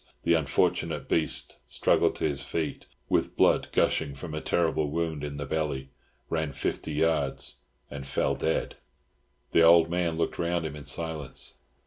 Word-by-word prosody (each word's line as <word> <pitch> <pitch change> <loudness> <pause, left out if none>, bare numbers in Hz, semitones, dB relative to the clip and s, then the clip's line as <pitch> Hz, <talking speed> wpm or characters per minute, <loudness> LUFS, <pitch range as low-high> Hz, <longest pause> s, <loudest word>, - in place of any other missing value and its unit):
The 85 - +4
unfortunate 80 -4 +1
beast 80 -5 0
struggled - - +2
to - - 0
his 70 -2 -2
feet, 80 -3 -3 0.2
with - - 0
blood - - +4
gushing 70 - +1
from 75 +3 -7
a 80 - -3
terrible 80 -3 +1
wound 80 -1 -2
in 70 -1 -4
the 70 - -4
belly, 70 -3 -2 0.4
ran 80 -3 -1
fifty 70 +3 -3
yards, 75 -3 0 0.3
and 70 -1 -7
fell 70 - +1
dead. 80 - -1 0.7
The - - +5
old 85 0 +7
man 85 -2 0
looked 85 - -1
round 85 -1 0
him 75 -1 -4
in 75 -2 -9
silence. 75 -1 -2
80 Hz, 155 wpm, -28 LUFS, 70-80 Hz, 0.7 s, old